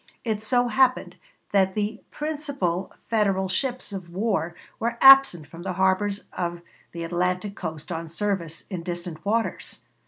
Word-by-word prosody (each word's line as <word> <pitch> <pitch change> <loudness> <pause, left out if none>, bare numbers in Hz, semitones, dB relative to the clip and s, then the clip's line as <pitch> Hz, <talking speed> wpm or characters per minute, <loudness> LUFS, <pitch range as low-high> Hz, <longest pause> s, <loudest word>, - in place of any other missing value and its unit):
It 220 -3 -1
so 245 +2 +2
happened 255 +2 +2 0.4
that 190 -2 +3
the 215 +1 -2
principal 285 - -2 0.2
Federal 200 -4 +1
ships 245 +3 -1
of 185 -3 -6
war 185 -3 -1 0.2
were 235 +1 -1
absent 270 - +8
from 165 +3 -11
the 185 +1 -3
harbors 190 +2 +1
of 175 -1 -3 0.3
the 170 -1 -5
Atlantic 180 +4 -1
coast 160 -1 -6
on 165 -1 -4
service 170 -3 -2
in 180 -3 -3
distant 175 -1 -5
waters. 225 +3 -2
190 Hz, 145 wpm, -25 LUFS, 175-220 Hz, 0.4 s, absent